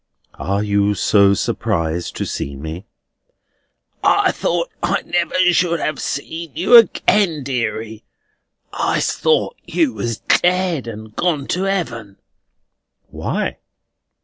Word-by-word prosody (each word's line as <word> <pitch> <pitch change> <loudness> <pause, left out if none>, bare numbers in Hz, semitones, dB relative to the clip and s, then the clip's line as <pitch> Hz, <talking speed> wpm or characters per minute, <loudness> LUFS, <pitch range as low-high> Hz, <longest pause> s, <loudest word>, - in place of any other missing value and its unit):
"Are 100 +2 -1
you 100 0 +1
so 100 +1 +4
surprised 85 -2 -2
to - - -3
see 70 - -4
me?" 80 +8 -7 1.2
"I 405 -1 +4
thought - - -1
I - - 0
never 175 -2 -1 0.2
should 170 0 +1
have 155 -2 -2
seen 160 +1 -5
you 245 - +4
again, 200 - +4
deary. 115 -4 -3 0.7
I - - 0
thought 475 +1 0
you 315 -6 0
was 115 -2 -3
dead, 180 -7 +1
and 110 -1 -9
gone 160 -6 0
to 185 +2 0
Heaven." 120 - -3 0.9
"Why?" - - -3
135 Hz, 115 wpm, -19 LUFS, -, 1.2 s, so